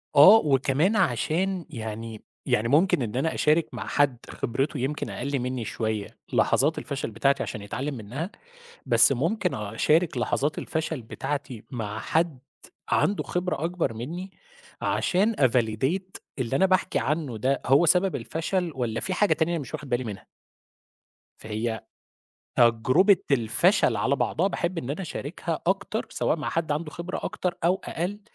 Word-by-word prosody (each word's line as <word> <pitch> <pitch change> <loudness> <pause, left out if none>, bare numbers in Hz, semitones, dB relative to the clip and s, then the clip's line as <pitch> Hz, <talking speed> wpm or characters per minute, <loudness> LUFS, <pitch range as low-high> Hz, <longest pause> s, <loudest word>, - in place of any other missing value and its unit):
آه، 170 +10 +10
وكمان 140 - +2
علشان 175 - +1
يعني 110 -4 -6 0.2
يعني 110 +2 +1
ممكن 150 +2 +3
إن 115 0 -3
أنا 150 +5 0
أشارك 155 +2 +2
مع - - -5
حد 140 -4 +2
خبرته 135 +6 -2
يمكن 140 +4 -2
أقَل 140 -1 -2
منّي 125 -2 -3
شوية 110 -2 -2 0.3
لحظات 150 +4 +3
الفشل 135 -5 -4
بتاعتي 135 +6 +1
عشان 105 - -5
يتعلِّم 130 +8 -4
منّها، 130 - -5 0.6
بس - - +6
ممكن 175 - 0
أشارك 130 - +1
لحظات 140 +4 0
الفشل 160 -4 -3
بتاعتي 130 0 -5
مع 110 -4 -4
حد 160 +4 0 0.5
عنده 205 - +2
خبرة 180 -4 -2
أكبر 170 -8 -1
منّي 170 - -6 0.5
علشان 205 +5 +1
أvalidate 130 - +1 0.2
اللي 130 +1 0
أنا 190 - +4
باحكي 185 -1 +1
عنّه 145 -6 -2
ده 130 +4 0
هو 140 +6 +5
سبب 185 +3 +3
الفشل 170 +1 -2
والّا 120 -4 -2
فيه 185 - -2
حاجة 205 +1 +3
تانية 160 +1 0
أنا 170 - -1
مش 125 -4 -9
واخِد 145 - -5
بالي 125 0 0
منها. 105 -3 -7 1.1
فهي 110 +1 -3 0.8
تجربة 125 - +5
الفشل 120 -6 +3
على - - +1
بعضها 185 +5 +1
باحب 175 -2 -2
إن 130 -3 -4
أنا 160 +6 -3
أشاركها 165 0 -4
أكتر 200 +4 0
سواء - - 0
مع 150 - -3
حد 160 -2 -1
عنده 150 +1 -3
خبرة 170 +3 -5
أكتر 180 -1 -2
أو 180 +3 +3
أقل 190 +5 -3
145 Hz, 150 wpm, -26 LUFS, 120-175 Hz, 1.1 s, آه